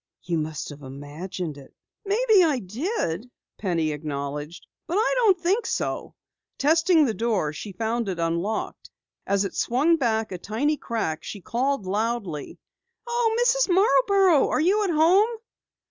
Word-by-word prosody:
"You 170 -2 -1
must 155 0 -4
have 145 -1 -10
imagined 145 +4 -6
it." 135 - -16 0.3
"Maybe 425 -1 +4
I 305 -5 +2
did," 230 - -3 0.3
Penny 170 -6 0
acknowledged, 150 +1 -5 0.2
"but 340 - -2
I 440 +5 +2
don't 415 -7 +4
think 380 +7 0
so." - - -3 0.4
Testing 325 +2 +4
the 230 - 0
door, 215 -10 -1
she 200 +6 -7
found 225 +2 -2
it 185 - -3
unlocked. 170 +6 -2 0.4
As 200 0 +1
it 195 - -5
swung 295 +8 +2
back 225 -6 0
a 180 - -5
tiny 255 - 0
crack, 220 - -3
she 205 - -7
called 250 +4 -1
loudly: 205 -5 -2 0.5
"Oh, 475 -2 0
Mrs. - - +3
Marborough, 390 - +4
are - - +1
you 390 +7 +3
at - - -1
home?" 345 +7 +4
230 Hz, 145 wpm, -25 LUFS, -, 0.5 s, Maybe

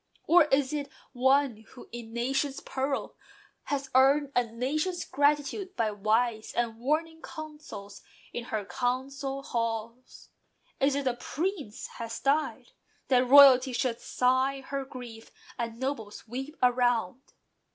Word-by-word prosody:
Or 345 -1 +6
is 280 -1 +1
it 285 -2 -3 0.2
one 265 -1 +3
who, 220 +3 -15
in 240 -1 -7
a - - -14
nation's 270 +4 -1
peril, 270 +1 -3 0.5
Has 275 -2 -3
earned 275 +2 +4
a 245 - +4
nation's 295 +10 -2
gratitude 295 +7 0
by 220 -2 +1
wise 220 +2 0
And 230 -2 -1
warning 320 +5 -1
counsels 300 -10 -9 0.3
in 240 - -4
her 215 -4 -3
council 270 +3 -2
halls? 230 0 -4 0.5
Is 275 0 +3
it 280 -1 -2
a 255 - +2
Prince 295 - -4
has 230 -1 -5
died? 300 - 0 0.4
That 255 -1 +4
royalty 265 -1 +8
Should 235 -1 -1
sigh 260 +2 +1
her 275 0 -4
grief, 245 -4 -10 0.3
and 230 -1 -4
nobles 235 -6 -4
weep 270 +7 -6
around? 245 -3 +2
260 Hz, 130 wpm, -29 LUFS, 235-280 Hz, 0.5 s, royalty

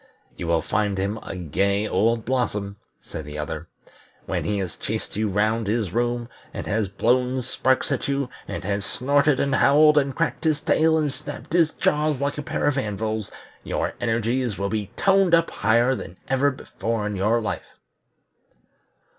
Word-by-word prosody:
"You 85 - -5
will 85 -1 +2
find 105 -2 0
him 100 +3 -1
a - - -7
gay 100 +5 0
old 115 +4 +1
blossom," 105 -6 -1 0.3
said 80 - -7
the 75 0 -8
other. 75 +2 -4 0.6
"When - - -2
he 105 -1 0
has 95 -4 -3
chased - - -4
you 110 0 0
round 110 +2 +1
his 105 -4 0
room, 120 0 0 0.3
and - - -4
has 105 -1 0
blown 125 +6 +1
sparks 130 +2 +1
at 140 - -1
you, 140 -1 0 0.2
and - - -5
has 100 +1 -1
snorted 140 +3 +2
and 140 -1 +1
howled, 150 +3 +6
and 135 -2 -2
cracked 135 +6 -1
his 155 -3 +2
tail, 160 +2 +3
and 150 -3 0
snapped - - -7
his 170 -3 +5
jaws 150 -2 +1
like 140 +1 -1
a - - -1
pair 145 - -2
of 145 -2 +2
anvils, 110 -2 -3 0.3
your - - -2
energies 115 -1 0
will 100 +1 -1
be 105 -2 -2
toned 195 -3 +4
up 165 0 +1
higher 115 +5 +3
than 95 -7 -7
ever 135 +2 +3
before 115 -4 -3
in 105 -1 -2
your 105 +5 +2
life." 110 - -5
115 Hz, 175 wpm, -24 LUFS, 100-140 Hz, 0.6 s, howled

